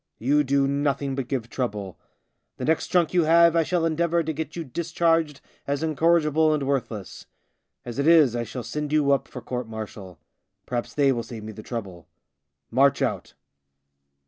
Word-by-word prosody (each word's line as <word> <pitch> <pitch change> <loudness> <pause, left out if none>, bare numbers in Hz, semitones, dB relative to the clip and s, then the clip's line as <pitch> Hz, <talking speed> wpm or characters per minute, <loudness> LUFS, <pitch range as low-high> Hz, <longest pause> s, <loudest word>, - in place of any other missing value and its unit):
You 145 +6 +2
do 140 0 +2
nothing 140 0 -1
but 135 -2 -3
give 125 -4 -3
trouble. 105 -7 -4 0.6
The 125 - -4
next 160 +2 +1
drunk 175 -3 +2
you 175 -3 +3
have 170 +1 +5
I 165 - +4
shall 170 +1 0
endeavour 170 +1 +1
to 160 0 -3
get 155 +1 -5
you 170 - -4
discharged 165 0 0 0.3
as 140 +2 -1
incorrigible 160 0 +3
and 145 - -2
worthless. 125 -7 -3 0.6
As 120 +2 -6
it 140 - +1
is, 155 -8 +6
I 120 - -1
shall 120 +2 -6
send 150 +5 -4
you 150 -2 +3
up 140 - +1
for - - -9
court 125 -2 -4
martial. 105 -5 -8 0.5
Perhaps 120 -1 -4
they 140 -2 +4
will 120 -3 -1
save 115 -2 -9
me 110 - -7
the 110 - -10
trouble. 100 -8 -7 0.6
March 135 +3 +3
out." - - -3
140 Hz, 175 wpm, -25 LUFS, 120-160 Hz, 0.6 s, is